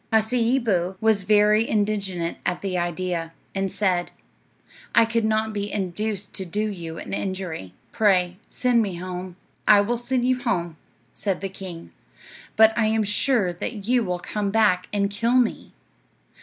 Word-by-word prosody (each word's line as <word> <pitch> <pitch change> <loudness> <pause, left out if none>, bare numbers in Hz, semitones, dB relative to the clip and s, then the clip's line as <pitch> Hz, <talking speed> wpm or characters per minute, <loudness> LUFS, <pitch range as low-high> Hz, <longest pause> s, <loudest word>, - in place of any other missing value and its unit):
Hasseeboo 220 -4 +1
was 220 -3 +2
very 210 +2 +4
indignant 200 -5 -1
at 175 0 -1
the 195 -2 -2
idea, 175 -1 -2 0.2
and 195 -1 -1
said, 180 -4 0 0.9
"I 230 - +7
could 230 0 0
not 220 0 +1
be 205 0 -3
induced 205 +1 -3
to 190 - -4
do 210 +5 -2
you 165 -5 -6
an - - -7
injury. 185 - -4 0.2
Pray, 185 -5 +2
send 250 -3 +2
me 200 -5 -2
home." 180 0 -6 0.3
"I 210 -1 +8
will 235 +4 0
send 245 +1 0
you 255 0 +1
home," 175 -9 -1 0.4
said 195 -3 -2
the 195 - -4
king; 185 -3 -8 0.6
"but 220 0 +6
I 230 -2 +2
am 220 0 +2
sure 210 -2 +1
that 205 +3 -5
you 245 +1 +3
will 180 -3 -2
come 200 +3 -3
back 200 -4 +3
and 200 -1 +1
kill 230 +4 +1
me." 250 -3 +1
205 Hz, 155 wpm, -24 LUFS, 180-220 Hz, 0.9 s, I